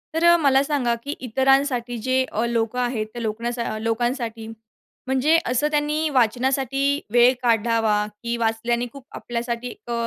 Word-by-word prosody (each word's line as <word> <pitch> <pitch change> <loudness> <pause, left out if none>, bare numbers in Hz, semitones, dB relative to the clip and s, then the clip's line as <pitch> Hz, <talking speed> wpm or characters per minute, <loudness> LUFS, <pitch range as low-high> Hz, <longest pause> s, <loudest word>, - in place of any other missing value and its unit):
तर 325 - 0
अ, - - +6
मला 275 -4 +4
सांगा, 280 -5 0
की 285 +2 -4
इतरांसाठी 260 -1 +1
जे 260 0 +3
अ, 225 +3 -1
लोकं 235 +1 -1
आहेत, 240 -3 -1
त्या 240 - -6
लोक 220 0 -3 0.4
लोकांसाठी, 230 0 -2 0.6
म्हणजे 265 +5 +3
असं, 255 +4 +1
त्यांनी 300 +1 0
वाचनासाठी 265 +3 +1
वेळ 245 +1 +6
काढावा, 225 -2 +2 0.2
की 235 0 -1
वाचल्याने 235 +1 0
खूप, 275 -2 -12
आपल्यासाठी, 240 0 -4
अ, 235 - -3
245 Hz, 145 wpm, -23 LUFS, 230-270 Hz, 0.6 s, अ